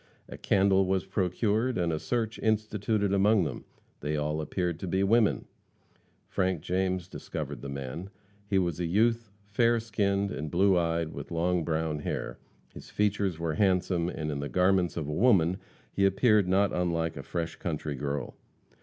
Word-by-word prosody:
A - - -8
candle 95 -1 +3
was 95 0 0
procured 105 +5 0
and 85 -2 0
a 80 - -1
search 115 +1 -2
instituted 110 -1 0
among 100 0 +4
them. 75 -6 -5 0.3
They 75 +1 -2
all 75 +1 -1
appeared 85 +2 -2
to 95 - -5
be 95 +2 +1
women. 110 +2 +3 0.8
Frank 95 -4 0
James 90 0 -1
discovered - - -6
the 70 - -6
man. 70 +7 -6 0.4
He 100 -1 +1
was 85 -3 0
a 85 - -1
youth, 115 +4 +2 0.2
fair 115 +3 +2
skinned 100 -3 0
and 75 +2 -4
blue 95 +3 +3
eyed, 85 -2 0
with - - -7
long 85 +1 0
brown 80 -1 -1
hair. - - -4 0.3
His - - -11
features 100 -4 0
were 85 -1 -2
handsome, 90 -1 +1
and 75 -3 -4
in 70 - -3
the 70 0 -4
garments 90 -1 +2
of 75 -4 -3
a 75 - -3
woman 95 -3 +3 0.4
he 100 - +1
appeared 105 0 +3
not 95 +2 +2
unlike 85 -2 -1
a 70 - -6
fresh 85 +3 -4
country 75 -3 -3
girl. 70 0 -3
90 Hz, 170 wpm, -29 LUFS, 80-100 Hz, 0.8 s, among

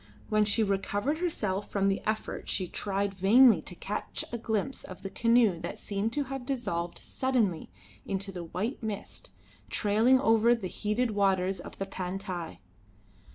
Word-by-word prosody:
When 215 0 +3
she 215 +2 +3
recovered 205 +8 0
herself 210 - -1
from 195 -1 +1
the 195 0 +1
effort 215 0 -2
she 185 - 0
tried 200 +2 -2
vainly 205 +1 +6
to 180 - -9
catch 205 +4 -4
a 235 - -2
glimpse 220 +4 -2
of 185 - -10
the 195 - -5
canoe 230 -6 +3
that - - -5
seemed 205 +2 -2
to 290 - 0
have 270 -1 -5
dissolved 175 -10 -2
suddenly 235 -10 -1 0.3
into 195 0 -3
the 175 -2 -6
white 210 - -3
mist 215 -3 -6 0.4
trailing 220 - +4
over 230 -1 +4
the 230 - -6
heated 215 +5 -1
waters 195 -2 +1
of - - -10
the 195 - -2
Pantai. 185 -2 -5
205 Hz, 155 wpm, -29 LUFS, 195-230 Hz, 0.4 s, vainly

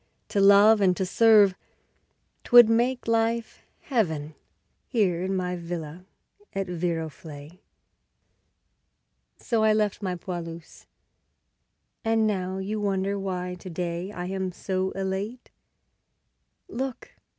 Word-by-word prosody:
To 200 - +1
love 200 +2 +6
and 185 -2 +3
to 190 - -1
serve 210 0 +5 0.9
'twould 240 -2 +8
make 240 +3 +1
life 230 0 0 0.2
Heaven 160 - -1 0.5
Here 190 -8 +1
in 190 +1 -2
my 180 -1 -2
villa 170 0 -7 0.5
at 195 0 -1
Viroflay. 165 -2 -5 1.8
So 230 -4 -1
I 215 0 +4
left 210 -1 0
my 185 -3 -2
'poilus': 170 -2 -8 1.2
and 225 0 +2
now 190 -3 -2
you 205 +3 -3
wonder 200 0 -1
Why 180 -2 -4
to 185 - -9
day 175 +2 -4
I 180 -3 -6
am 190 0 -3
so 185 +1 -2
elate.... 195 +5 -4 1.2
Look! 260 +1 -5
190 Hz, 110 wpm, -26 LUFS, 180-215 Hz, 1.8 s, twould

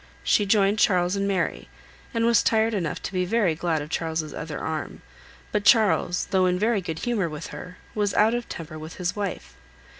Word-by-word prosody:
She 205 - +3
joined 200 0 +3
Charles 180 -1 +3
and 200 0 0
Mary, 185 - -1 0.4
and 230 0 0
was 235 -2 +5
tired 225 0 +2
enough 175 -7 -2
to - - -5
be 185 -1 +1
very 190 -2 +2
glad 160 -1 -1
of 150 - -11
Charles's 160 -3 -2
other 150 -1 -5
arm; 160 -1 -5 0.5
but 210 - 0
Charles, 210 -6 +4
though 185 -1 +3
in 180 0 +1
very 215 +1 +1
good 165 -3 -5
humour 215 -8 0
with 150 -1 -7
her, 180 0 -9 0.2
was 205 -2 0
out 220 +2 +4
of 240 0 -3
temper 155 -1 -7
with 155 +1 -9
his 180 -1 -2
wife. 200 - -4
185 Hz, 200 wpm, -25 LUFS, 165-210 Hz, 0.5 s, was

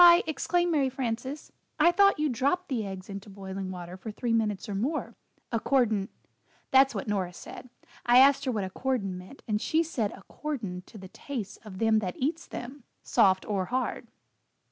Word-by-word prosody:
exclaimed 345 +3 +1
Mary 280 -4 +2
Frances, 260 +2 -4 0.3
"I 325 +3 +6
thought 395 +2 +5
you 305 0 +1
dropped 285 +8 0
the 245 -5 0
eggs 190 -1 -7
into 200 +1 -7
boiling 195 -1 -6
water 180 -1 -7
for 220 - -7
three 230 +2 -2
minutes 215 -3 0
or 205 - -4
more, 255 +11 -1 0.4
'accordin' 225 -4 +2 0.6
that's 265 -2 +6
what 195 - -3
Nora 190 -4 -1
said. 255 - -10 0.3
I 240 +1 +5
asked 275 +2 +6
her 260 - +1
what 210 -4 -1
'accordin' 195 0 -2
meant, 180 +9 -11
and 210 -1 0
she 320 +1 +2
said 235 -10 -1
'accordin' 200 -4 -5
to - - -12
the 190 -2 -10
tastes 230 -3 -6
of 210 -4 -11
them 220 +1 +3
that 185 -4 -4
eats 310 +5 -1
them 260 +2 -7 0.2
soft 190 -5 +4
or 195 -3 0
hard." 255 +5 -2
230 Hz, 175 wpm, -28 LUFS, 195-275 Hz, 0.6 s, I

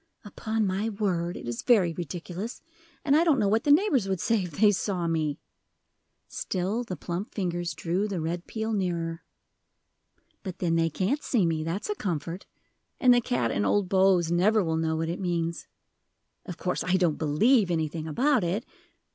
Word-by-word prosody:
"Upon 220 +1 -2
my 195 +3 -1
word, 185 -5 -1
it - - -8
is 120 -1 -3
very 195 -9 +3
ridiculous, 175 - -6 0.4
and 285 -1 +4
I 320 - +5
don't 320 -5 +3
know 205 - +2
what 220 +3 +1
the 290 - +4
neighbors 290 - +3
would 190 -2 -1
say 225 +3 +1
if 180 -4 -6
they 210 -1 +6
saw 185 -2 -1
me." 155 -3 0 0.9
Still 195 +6 -2
the 190 -6 -5
plump 175 +5 -5
fingers 175 -5 -2
drew 175 +6 -1
the 195 -4 -3
red 170 +2 -3
peel 220 0 -3
nearer. 170 -4 -2 1.2
"But 185 -4 -6
then 170 -2 0
they 165 0 +2
can't 200 - -1
see 220 -8 +1
me, 160 -2 0
that's 165 +5 -3
a 420 - 0
comfort; 175 - -4 0.5
and 250 -2 +6
the 245 - +4
cat 125 - 0
and 100 - 0
old 190 - +1
Bose 190 -3 +3
never 200 +5 +3
will 160 -2 -1
know 160 0 0
what 160 +1 -1
it 170 +2 -3
means. 170 -3 -2 0.8
Of 180 - -6
course 180 - -2
I 180 - +1
don't 175 -5 +1
believe 195 - +3
anything 160 -1 -2
about 255 - +2
it." 190 +7 -1
180 Hz, 180 wpm, -27 LUFS, 165-215 Hz, 1.2 s, they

